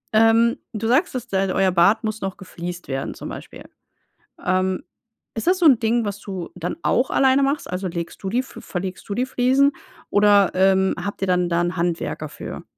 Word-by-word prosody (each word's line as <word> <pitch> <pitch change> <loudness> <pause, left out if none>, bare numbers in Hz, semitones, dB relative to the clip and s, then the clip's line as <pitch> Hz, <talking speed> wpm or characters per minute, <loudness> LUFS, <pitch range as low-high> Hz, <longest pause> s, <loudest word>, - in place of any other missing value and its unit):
Ähm, 225 +1 +4
du 225 -1 -3
sagst, 275 +10 +2
dass 250 -2 -4
d 200 - -5 0.2
euer 190 0 +2
Bad 185 +6 +3
muss 220 0 -3
noch 195 -1 -4
gefliest 180 -2 -7
werden, 135 0 -3
zum - - -8
Beispiel. - - -9 0.8
Ähm, 185 0 0 0.5
ist 225 - -4
das 365 +1 +3
so 355 - 0
'n 275 -7 +7
Ding, 230 +1 +1
was 205 -1 -4
du 190 -4 -6
dann 175 - -4
auch 250 +2 +2
alleine 265 0 +4
machst? 275 +2 -1
Also, 180 +1 -3
legst 170 -1 -6
du 195 - -3
die 235 +6 +1
f 260 - -9
verlegst 185 0 -6
du 200 - -2
die 245 - 0
Fliesen 260 +2 +3 0.4
oder, 205 -1 +5
ähm, 190 0 +3
habt 200 -1 -5
ihr - - +2
dann 180 -1 +2
da 170 0 +1
'n 175 +1 -2
Handwerker 170 0 -2
für? - - -8
200 Hz, 200 wpm, -22 LUFS, 180-240 Hz, 0.8 s, n